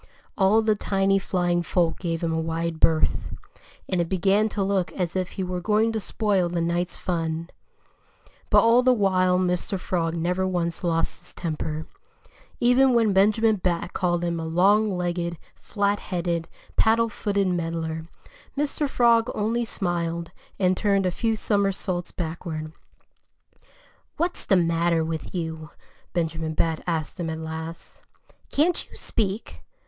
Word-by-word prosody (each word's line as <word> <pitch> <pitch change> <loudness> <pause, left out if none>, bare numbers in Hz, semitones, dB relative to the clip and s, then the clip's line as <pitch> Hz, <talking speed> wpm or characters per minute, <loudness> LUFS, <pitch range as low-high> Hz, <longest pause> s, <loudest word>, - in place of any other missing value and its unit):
All 210 +3 +4
the 215 -1 +3
tiny 195 -1 +1
flying 175 -2 0
folk 170 0 0
gave 165 -2 -2
him 165 -1 0
a 160 - 0
wide 165 0 -2
berth. 160 -1 +2 0.5
And 185 -2 +1
it 170 - -2
began 195 +3 +2
to 200 -1 -1
look 190 -3 0
as 180 -2 -2
if 185 -1 -2
he 190 - -3
were 180 0 -3
going 215 +3 +2
to 220 - -1
spoil 200 -4 0
the 175 0 -2
night's 175 +1 -1
fun. 165 -1 -2 1.0
But - - +6
all 230 +2 +6
the 255 0 +4
while 185 -3 +3
Mr. 180 +1 0
Frog 170 -2 -1
never 180 +3 0
once 175 -1 -2
lost 165 -1 0
his 175 - -13
temper. 155 -2 -3 0.7
Even 250 +1 +4
when 225 -3 +3
Benjamin 215 +3 +4
Bat 180 -1 -2
called 175 -2 0
him 170 -1 -1
a 165 - -4
long 200 +6 +4
legged, 175 -2 -2 0.2
flat 205 -1 -1
headed, 170 -2 -2 0.3
paddle 230 +1 +4
footed 200 -3 -1
meddler, 165 -2 -2 0.5
Mr. 295 0 0
Frog 235 -2 +4
only 225 +3 0
smiled 170 -5 -2 0.3
and 185 -1 +2
turned 200 -1 +2
a 180 - +2
few 225 +4 0
somersaults 195 -4 -1
backward. 160 -2 -5 1.4
"What's 345 +3 -1
the 195 - +5
matter 170 -1 +2
with 160 +3 -5
you?" 160 -2 -4 0.4
Benjamin 160 -2 -2
Bat 160 0 0
asked 160 -2 -2
him 170 -2 -2
at 160 - -3
last. 160 +1 -7 0.5
"Can't 330 +4 +1
you - - -13
speak?" 210 -1 -3
180 Hz, 150 wpm, -25 LUFS, 165-205 Hz, 1.4 s, But